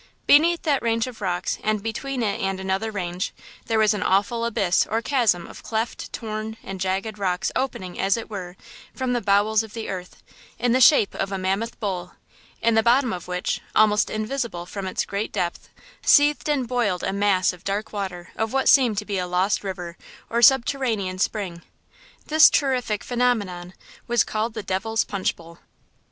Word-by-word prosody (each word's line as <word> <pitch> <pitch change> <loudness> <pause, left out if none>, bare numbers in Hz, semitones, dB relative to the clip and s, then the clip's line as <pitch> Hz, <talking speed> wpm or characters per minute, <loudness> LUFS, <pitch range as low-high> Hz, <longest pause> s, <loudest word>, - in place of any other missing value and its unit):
Beneath 335 +4 +5
that 290 -4 +1
range 230 -1 +1
of 250 -4 -9
rocks, 180 -2 -2
and 215 -1 0
between 245 +3 -3
it 205 -2 -1
and 195 0 -1
another 190 +3 -1
range, 180 -3 -3 0.3
there 225 -1 +1
was 215 0 +4
an 210 - -3
awful 230 +5 +1
abyss 195 -6 +1
or 225 - +1
chasm 230 -9 +1
of - - -11
cleft, 225 +1 -3
torn 220 0 -5
and 195 -1 -7
jagged 195 +3 -2
rocks 180 -2 -1
opening, 190 -9 -3
as 195 +3 +2
it 230 - -6
were, 185 -4 -7 0.4
from 260 -2 -1
the 240 - 0
bowels 205 +2 +3
of 220 0 -10
the 225 - -5
earth, 180 -2 -7 0.3
in 245 +1 +1
the 255 +2 +3
shape 255 -6 +6
of 195 0 -3
a 195 - -2
mammoth 195 +5 -2
bowl, 180 -4 -4 0.5
in 230 - +4
the 225 - +4
bottom 245 +1 +3
of 180 -1 -7
which, 180 0 -2
almost 210 -1 +4
invisible 215 -4 -3
from 195 +1 -6
its 185 - -2
great 200 +2 -3
depth, 175 -1 -3 0.3
seethed 295 +1 +4
and 275 -5 0
boiled 225 -7 0
a - - -1
mass 200 -2 +2
of 180 0 -15
dark 205 +3 -3
water 185 -4 -5
of 220 0 -2
what 270 0 +1
seemed 245 -7 +5
to 210 - -2
be 200 -2 -2
a 180 - -2
lost 185 +4 +1
river 180 -3 -6 0.3
or 235 - +1
a - - 0
subterranean 235 -7 +3
spring. 185 -4 -2 0.6
This 315 +1 +7
terrific 250 -7 0
phenomenon 205 -8 -1 0.3
was 240 0 +3
called 220 +1 -3
the 215 - -4
Devil's 205 +4 0
Punch 195 -2 -2
Bowl. 170 0 -15
215 Hz, 185 wpm, -23 LUFS, 190-235 Hz, 0.6 s, This